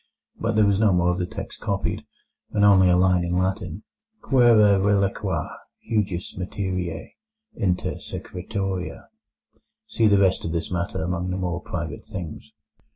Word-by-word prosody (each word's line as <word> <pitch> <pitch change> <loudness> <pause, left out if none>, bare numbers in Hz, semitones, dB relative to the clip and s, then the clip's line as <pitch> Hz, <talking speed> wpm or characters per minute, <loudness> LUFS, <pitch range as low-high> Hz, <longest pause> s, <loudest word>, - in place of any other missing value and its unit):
But 115 0 -1
there 105 -1 +5
was 100 -1 +2
no 110 -2 +4
more 90 -1 +3
of 90 - -2
the 90 - -1
text - - -7
copied, - - -2 0.5
only 100 -3 +6
a 90 - +4
line 90 -1 +3
in 85 +1 -1
Latin: 95 0 -2 0.4
Quære 110 -6 +5
reliqua 100 -1 +1 0.4
hujus 100 -5 -1
materiei 90 -3 -4 0.4
inter 90 -2 -1
secretiora. 95 0 -5 0.8
(See 115 - +2
the 100 -1 +5
rest 95 -1 +3
of 80 - -3
this 85 +1 -2
matter 85 -2 -2
among 90 +1 -2
the 90 - -2
more 90 -1 -2
private 85 -4 -5
things.) 85 -5 -8
95 Hz, 145 wpm, -24 LUFS, 90-100 Hz, 0.8 s, only